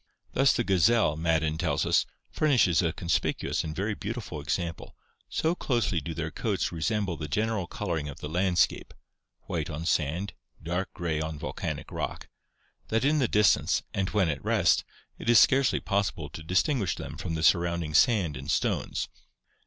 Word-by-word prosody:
Thus 135 Hz, 0 st, +4 dB
the 120 Hz, -, 0 dB
gazelle, 95 Hz, -3 st, +3 dB
Madden 80 Hz, -1 st, 0 dB
tells 80 Hz, -6 st, 0 dB
us, -, -, +2 dB, 0.2 s
"furnishes 125 Hz, -, +3 dB
a 85 Hz, -2 st, +1 dB
conspicuous 85 Hz, +1 st, -1 dB
and 80 Hz, -1 st, -5 dB
very 105 Hz, +3 st, -1 dB
beautiful 105 Hz, -7 st, -5 dB
example, 85 Hz, +2 st, -3 dB, 0.3 s
so 160 Hz, +1 st, +1 dB
closely 110 Hz, -, 0 dB
do 80 Hz, +3 st, -6 dB
their -, -, -3 dB
coats -, -, -1 dB
resemble 85 Hz, +2 st, -1 dB
the 75 Hz, -, -5 dB
general 105 Hz, +3 st, -1 dB
coloring 85 Hz, -7 st, -3 dB
of 70 Hz, -, -9 dB
the -, -, -5 dB
landscape 90 Hz, +2 st, +1 dB, 0.5 s
[white 80 Hz, -4 st, -3 dB
on 80 Hz, +1 st, -5 dB
sand, 85 Hz, +4 st, 0 dB, 0.3 s
dark 90 Hz, +4 st, -2 dB
grey 80 Hz, -3 st, -2 dB
on 80 Hz, 0 st, -4 dB
volcanic 75 Hz, -, -5 dB
rock] -, -, -4 dB, 0.6 s
that 115 Hz, +3 st, 0 dB
in 150 Hz, +2 st, +3 dB
the 130 Hz, -, +2 dB
distance, 105 Hz, -2 st, +3 dB
and 95 Hz, -1 st, -1 dB
when 100 Hz, -5 st, +2 dB
at 70 Hz, -4 st, -3 dB
rest, -, -, +3 dB, 0.4 s
it -, -, -3 dB
is 120 Hz, -, +8 dB
scarcely 135 Hz, -1 st, +4 dB
possible 85 Hz, -7 st, -1 dB
to 80 Hz, -, -9 dB
distinguish 95 Hz, -, +1 dB
them -, -, -7 dB
from 85 Hz, 0 st, -4 dB
the 80 Hz, -, -3 dB
surrounding 85 Hz, -2 st, +2 dB
sand 90 Hz, -, +3 dB
and 65 Hz, +2 st, -7 dB
stones." -, -, 0 dB
85 Hz, 165 wpm, -28 LUFS, 80-105 Hz, 0.6 s, is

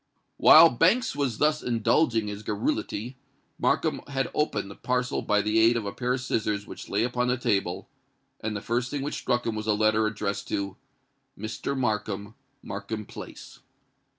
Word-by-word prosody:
While 165 Hz, +1 st, +9 dB
Banks 180 Hz, -, +2 dB
was 135 Hz, -6 st, -1 dB
thus 150 Hz, 0 st, +2 dB
indulging 115 Hz, 0 st, +2 dB
his 105 Hz, 0 st, -5 dB
garrulity, 110 Hz, +3 st, -2 dB, 0.4 s
Markham -, -, +1 dB
had 135 Hz, -2 st, -2 dB
opened 105 Hz, -10 st, -1 dB
the -, -, -10 dB
parcel 125 Hz, 0 st, -1 dB
by 105 Hz, 0 st, +1 dB
the 105 Hz, +2 st, +2 dB
aid 115 Hz, +1 st, +5 dB
of 110 Hz, -, -3 dB
a 100 Hz, -, -3 dB
pair 125 Hz, +2 st, -1 dB
of 130 Hz, -, -5 dB
scissors 105 Hz, -4 st, -1 dB
which -, -, -10 dB
lay 100 Hz, +3 st, +1 dB
upon 125 Hz, 0 st, 0 dB
the 125 Hz, +1 st, +1 dB
table; 100 Hz, -7 st, -1 dB, 0.5 s
and 110 Hz, 0 st, -3 dB
the 100 Hz, -, -4 dB
first 120 Hz, +3 st, -1 dB
thing 145 Hz, -1 st, -3 dB
which 145 Hz, -, -3 dB
struck 120 Hz, 0 st, -1 dB
him 115 Hz, -, -1 dB
was 110 Hz, 0 st, -5 dB
a 110 Hz, -, +4 dB
letter 110 Hz, +1 st, +3 dB
addressed 100 Hz, -2 st, -3 dB
to 100 Hz, -1 st, -3 dB, 0.6 s
"Mr. 110 Hz, +6 st, -4 dB
Markham, 105 Hz, -4 st, -2 dB, 0.3 s
Markham 105 Hz, +2 st, -5 dB
Place." -, -, -10 dB
110 Hz, 175 wpm, -27 LUFS, 105-125 Hz, 0.6 s, While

